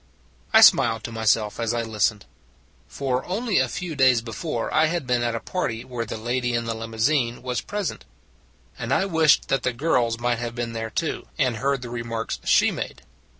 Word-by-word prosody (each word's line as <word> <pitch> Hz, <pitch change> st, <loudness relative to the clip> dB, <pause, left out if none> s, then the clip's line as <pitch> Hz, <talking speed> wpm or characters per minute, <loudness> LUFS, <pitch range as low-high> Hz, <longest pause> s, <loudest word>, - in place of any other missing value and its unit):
I -, -, +7 dB
smiled 115 Hz, -2 st, +6 dB
to 115 Hz, -, -5 dB
myself 110 Hz, -1 st, +1 dB
as 115 Hz, 0 st, 0 dB
I 115 Hz, -, -1 dB
listened. 105 Hz, -2 st, 0 dB, 0.6 s
For 130 Hz, -2 st, -2 dB
only 215 Hz, +3 st, 0 dB
a -, -, +2 dB
few 175 Hz, -4 st, -5 dB
days 130 Hz, -4 st, +4 dB
before 115 Hz, +2 st, -4 dB
I 155 Hz, +1 st, +4 dB
had 170 Hz, -2 st, -2 dB
been 125 Hz, -1 st, +1 dB
at 120 Hz, -1 st, -1 dB
a -, -, -2 dB
party 115 Hz, -5 st, -3 dB
where 120 Hz, -2 st, -4 dB
the -, -, -5 dB
lady 120 Hz, +2 st, -1 dB
in 120 Hz, 0 st, -1 dB
the 115 Hz, -, -2 dB
limousine 115 Hz, +3 st, -1 dB
was 125 Hz, -1 st, -2 dB
present: 205 Hz, -2 st, -4 dB, 0.7 s
and 115 Hz, 0 st, -4 dB
I 140 Hz, -, +3 dB
wished 160 Hz, -5 st, +3 dB
that 135 Hz, -, +1 dB
the 125 Hz, -, -1 dB
girls 120 Hz, -4 st, +1 dB
might 120 Hz, -1 st, 0 dB
have 120 Hz, -1 st, -4 dB
been 120 Hz, -1 st, -3 dB
there 115 Hz, 0 st, -4 dB
too, 160 Hz, +7 st, -3 dB
and 130 Hz, -7 st, +1 dB
heard 135 Hz, +1 st, -1 dB
the 120 Hz, -, -7 dB
remarks 115 Hz, -1 st, -4 dB
she -, -, +4 dB
made. 65 Hz, -, -6 dB
120 Hz, 195 wpm, -24 LUFS, 115-135 Hz, 0.7 s, I